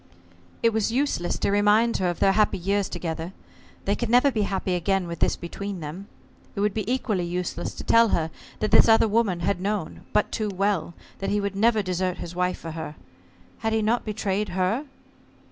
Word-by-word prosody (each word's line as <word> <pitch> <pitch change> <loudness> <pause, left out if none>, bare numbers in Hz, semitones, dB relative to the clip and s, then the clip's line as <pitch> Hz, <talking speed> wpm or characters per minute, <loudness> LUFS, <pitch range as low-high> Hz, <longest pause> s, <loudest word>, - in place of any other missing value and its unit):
It 230 - +5
was 220 0 +1
useless 250 -9 0
to - - 0
remind 210 +3 +3
her 185 -2 +1
of 175 - -3
their 195 - +4
happy 210 +2 +2
years 195 +2 0
together. 165 0 -4 0.5
They 200 - +2
could 240 0 -3
never 250 +4 +5
be 220 -3 0
happy 190 -1 -1
again 190 +1 +1
with 170 0 -6
this - - +2
between 200 +2 -6
them. 165 +6 -7 0.5
It 200 - -2
would 205 -1 +1
be 215 +1 -2
equally 215 -8 0
useless 175 0 -3
to - - -7
tell 230 0 +5
her 160 -5 0 0.3
that 215 - 0
this - - +7
other 225 0 +6
woman 210 -5 +1
had 180 +1 0
known, 200 -4 -3
but 210 - +1
too 215 -1 -1
well, 195 -4 -1 0.2
that 195 - -2
he 205 - +1
would 200 -1 -2
never 220 +1 +3
desert 185 -1 -1
his 170 - -7
wife 180 +1 0
for 165 - -7
her. 160 -1 -6 0.6
Had 220 -1 -1
he 220 -1 +1
not 230 +3 +1
betrayed 210 -1 -2
her? 205 +10 +1
200 Hz, 200 wpm, -25 LUFS, 180-215 Hz, 0.6 s, this